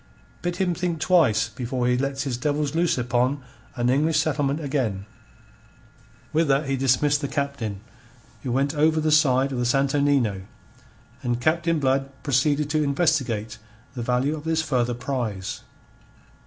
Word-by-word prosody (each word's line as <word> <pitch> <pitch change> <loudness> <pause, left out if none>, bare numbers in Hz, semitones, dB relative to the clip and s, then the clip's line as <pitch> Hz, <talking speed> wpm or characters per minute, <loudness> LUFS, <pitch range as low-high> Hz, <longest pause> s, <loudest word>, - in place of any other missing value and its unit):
Bid 175 0 -2
him 180 -1 0
think 170 -1 -2
twice 155 - +3
before 120 +3 -3
he 125 - +3
lets 135 +1 -1
his 135 -4 -2
devils 145 +3 -1
loose 170 -1 +1
upon 125 +3 0 0.3
an 120 -1 0
English 155 +4 +2
settlement 145 -2 0
again." 130 -10 -2 1.3
With 160 +1 +2
that 140 +2 +2
he 135 - 0
dismissed 135 +2 +2
the 140 - -2
Captain, 135 -9 -3 0.6
who 125 - -4
went 135 +3 +1
over 155 +1 +2
the 155 0 +1
side 140 -3 +3
of 130 - -3
the 125 - 0
Santo 135 +3 +2
Nino, 130 -9 +1 0.8
and 120 -2 -1
Captain 165 +4 +1
Blood 135 -1 +1
proceeded 145 +2 +1
to 155 0 +2
investigate 135 -8 0 0.3
the 125 - -5
value 125 +5 0
of 150 - -8
this 160 0 0
further 125 -4 0
prize. 120 -6 -4
140 Hz, 155 wpm, -24 LUFS, 125-155 Hz, 1.3 s, twice